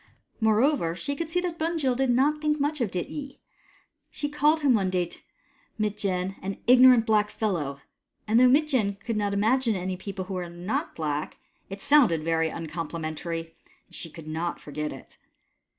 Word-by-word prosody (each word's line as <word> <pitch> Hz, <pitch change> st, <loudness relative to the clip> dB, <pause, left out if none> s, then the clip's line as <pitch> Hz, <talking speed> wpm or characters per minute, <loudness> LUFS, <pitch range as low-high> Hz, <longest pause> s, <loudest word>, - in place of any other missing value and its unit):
Moreover, 220 Hz, -, +2 dB
she 285 Hz, +9 st, -4 dB
could 325 Hz, +2 st, -4 dB
see 355 Hz, +1 st, +2 dB
that 350 Hz, -2 st, -4 dB
Bunjil 315 Hz, -6 st, 0 dB
did 265 Hz, +1 st, +1 dB
not 285 Hz, +5 st, +2 dB
think 300 Hz, -1 st, +1 dB
much 290 Hz, 0 st, -1 dB
of 230 Hz, -, +1 dB
Dityi. 275 Hz, -, -5 dB, 0.7 s
He 290 Hz, -, -4 dB
called 300 Hz, +2 st, +2 dB
him 280 Hz, -3 st, +4 dB
one 195 Hz, -4 st, +2 dB
day 180 Hz, -1 st, +1 dB
to 170 Hz, -, -10 dB, 0.6 s
Mitjen, 195 Hz, -3 st, -1 dB
" -, -, -25 dB
an 195 Hz, +1 st, -4 dB
ignorant 250 Hz, -1 st, +7 dB
black 210 Hz, -1 st, +2 dB
fellow," 160 Hz, -11 st, -2 dB, 0.5 s
and 220 Hz, +2 st, +4 dB
though 255 Hz, -, +7 dB
Mitjen 255 Hz, -8 st, +2 dB
could 230 Hz, +3 st, -4 dB
not 205 Hz, -1 st, 0 dB
imagine 225 Hz, +3 st, +2 dB
any 185 Hz, 0 st, -3 dB
people 190 Hz, 0 st, -6 dB
who 190 Hz, -, -6 dB
were 180 Hz, -2 st, -4 dB
not 175 Hz, +5 st, -3 dB
black, 150 Hz, -2 st, -3 dB, 0.3 s
it 195 Hz, +1 st, -7 dB
sounded 235 Hz, -, +4 dB
very 165 Hz, 0 st, +1 dB
uncomplimentary, 165 Hz, 0 st, -5 dB, 0.3 s
and -, -, -16 dB
she 165 Hz, -, -5 dB
could 160 Hz, 0 st, -12 dB
not 165 Hz, +2 st, -3 dB
forget 150 Hz, +1 st, -5 dB
it. -, -, -12 dB
210 Hz, 175 wpm, -26 LUFS, 170-265 Hz, 0.7 s, ignorant